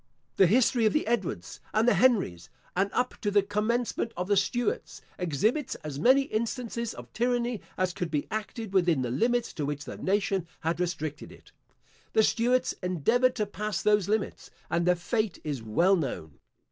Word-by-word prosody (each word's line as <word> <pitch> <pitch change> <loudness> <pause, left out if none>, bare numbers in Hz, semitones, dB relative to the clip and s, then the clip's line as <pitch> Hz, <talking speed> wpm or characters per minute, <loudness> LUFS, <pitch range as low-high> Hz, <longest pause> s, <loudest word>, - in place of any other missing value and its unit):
The 190 - +6
history 235 +2 +3
of - - +1
the 305 - +1
Edwards 190 - -2 0.2
and 220 +2 +3
the 245 - +6
Henries, 190 - +2 0.3
and 195 +2 +2
up 250 0 -1
to 210 - 0
the 205 -1 +3
commencement 225 +3 -1
of 180 +1 -2
the 205 - +3
Stuarts, 225 +4 -1 0.2
exhibits 215 - 0
as 145 -2 -5
many 260 - +5
instances 235 -1 -3
of - - -11
tyranny 240 -2 0 0.2
as 185 -1 0
could 180 -3 -3
be 150 -2 -1
acted 215 0 -4
within 175 -8 +3
the 120 - -2
limits 240 - +1
to 155 - -4
which 145 +1 -4
the - - -7
nation 195 -2 0
had 165 +1 -1
restricted 160 -4 -3
it. - - -17 0.6
The 220 - +5
Stuarts 245 +4 +2
endeavoured 225 - +2
to 215 -4 0
pass 210 0 -3
those 210 -2 +3
limits, 215 -1 -2 0.2
and 170 +1 +1
their 180 - +5
fate 215 +3 -1
is 145 -5 -3
well 170 - +3
known. 100 - -4
205 Hz, 175 wpm, -28 LUFS, 170-235 Hz, 0.6 s, The